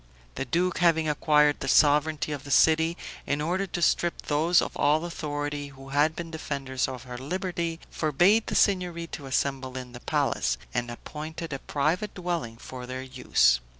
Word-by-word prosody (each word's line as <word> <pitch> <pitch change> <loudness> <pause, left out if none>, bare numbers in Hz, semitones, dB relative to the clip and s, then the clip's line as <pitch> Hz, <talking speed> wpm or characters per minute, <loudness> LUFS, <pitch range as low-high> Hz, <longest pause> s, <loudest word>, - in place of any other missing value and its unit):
The 135 - -3
duke, 175 +8 0
having 165 -2 +3
acquired 150 0 +3
the - - -4
sovereignty 150 +2 +3
of 145 - -4
the 145 - -10
city, 160 +4 +4 0.3
in 145 - 0
order 180 +6 -1
to 175 -1 -3
strip 175 0 +1
those 160 +4 +3
of - - -2
all 155 +3 +2
authority 145 -3 -4
who 135 -1 -13
had 145 +3 +2
been 170 -1 -6
defenders 135 -4 -2
of 130 -2 -7
her 125 -1 -8
liberty, 170 +2 -3
forbade 175 +9 +3
the - - -2
Signory 180 -4 +2
to 145 -4 -8
assemble 130 -1 -1
in 125 -1 -7
the 120 - -9
palace, - - 0 0.2
and 120 -1 -1
appointed 155 +6 -7
a 135 - -4
private 165 +11 -1
dwelling 170 -11 -3
for 125 +1 -8
their 130 +1 -5
use. 125 - +3
150 Hz, 175 wpm, -27 LUFS, 130-170 Hz, 0.3 s, city